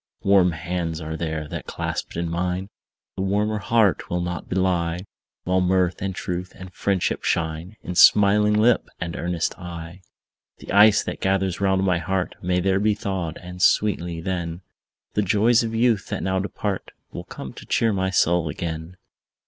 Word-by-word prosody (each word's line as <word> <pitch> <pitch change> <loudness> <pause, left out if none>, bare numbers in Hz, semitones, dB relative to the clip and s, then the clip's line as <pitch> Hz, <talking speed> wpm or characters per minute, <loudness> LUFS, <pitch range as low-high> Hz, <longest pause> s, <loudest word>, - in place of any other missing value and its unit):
Warm 95 -3 +4
hands 85 -1 -3
are 80 -1 -5
there, 80 -2 -3
that, - - -6
clasped - - -4
in 85 0 -1
mine, 90 +3 -2 0.5
The 95 - -3
warmer 105 +2 0
heart 110 -1 +2
will 90 - -1
not 90 0 -4
belie; 90 -2 0 0.4
While 95 +1 +1
mirth, 90 0 +1
and 95 -1 -2
truth, 90 +1 -4
and 90 0 -11
friendship 100 -3 -1
shine 80 +5 -2
In 90 - -4
smiling 105 +3 +6
lip 115 +3 +3
and 85 -1 -4
earnest 85 -1 -2
eye. 85 0 -8 0.6
The - - -9
ice 105 +2 +6
that - - -5
gathers 95 -1 0
round 95 -1 +2
my 90 -3 +2
heart 95 +1 -2
May 90 0 +1
there 95 +1 +2
be 105 +1 +2
thawed; 95 -6 -3
and 90 +1 -8
sweetly, 85 -5 +2
then, 85 -1 -3 0.5
The 105 - +2
joys 110 +4 +3
of 115 -1 -3
youth, 115 -3 +2
that - - -3
now 95 +1 0
depart, 100 0 -3 0.2
Will - - -7
come 65 - -8
to - - -11
cheer 115 -2 +2
my 95 -1 0
soul 85 -3 +2
again. 80 +3 -5
90 Hz, 170 wpm, -23 LUFS, 85-100 Hz, 0.6 s, smiling